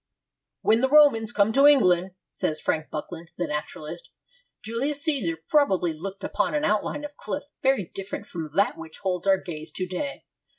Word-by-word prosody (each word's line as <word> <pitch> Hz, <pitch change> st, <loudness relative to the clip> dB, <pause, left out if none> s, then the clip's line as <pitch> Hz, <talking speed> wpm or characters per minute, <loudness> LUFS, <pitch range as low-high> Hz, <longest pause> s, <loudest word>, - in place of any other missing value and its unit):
'When 225 Hz, +2 st, +3 dB
the 265 Hz, -, +2 dB
Romans 275 Hz, -7 st, +5 dB
came 205 Hz, +2 st, +2 dB
to 275 Hz, +3 st, +6 dB
England,' 185 Hz, -10 st, +4 dB, 0.2 s
says 155 Hz, 0 st, -2 dB
Frank 155 Hz, 0 st, -1 dB
Buckland, 165 Hz, +2 st, -7 dB
the 175 Hz, -, -1 dB
naturalist, 150 Hz, -, -6 dB, 0.5 s
'Julius 270 Hz, +6 st, -1 dB
Caesar 250 Hz, -, +1 dB
probably 190 Hz, -, +2 dB
looked 195 Hz, +5 st, -7 dB
upon -, -, 0 dB
an 295 Hz, -, +1 dB
outline 215 Hz, +8 st, 0 dB
of 295 Hz, 0 st, -9 dB
cliff 290 Hz, -, -4 dB, 0.2 s
very 265 Hz, -7 st, +2 dB
different 195 Hz, +1 st, -5 dB
from 165 Hz, -6 st, -6 dB
that 200 Hz, -3 st, +2 dB
which 160 Hz, -1 st, -9 dB
holds 185 Hz, -1 st, -1 dB
our 195 Hz, 0 st, +5 dB
gaze 165 Hz, -4 st, -8 dB
to 185 Hz, -, -2 dB
day. 190 Hz, +11 st, -5 dB
195 Hz, 170 wpm, -25 LUFS, 170-275 Hz, 0.5 s, to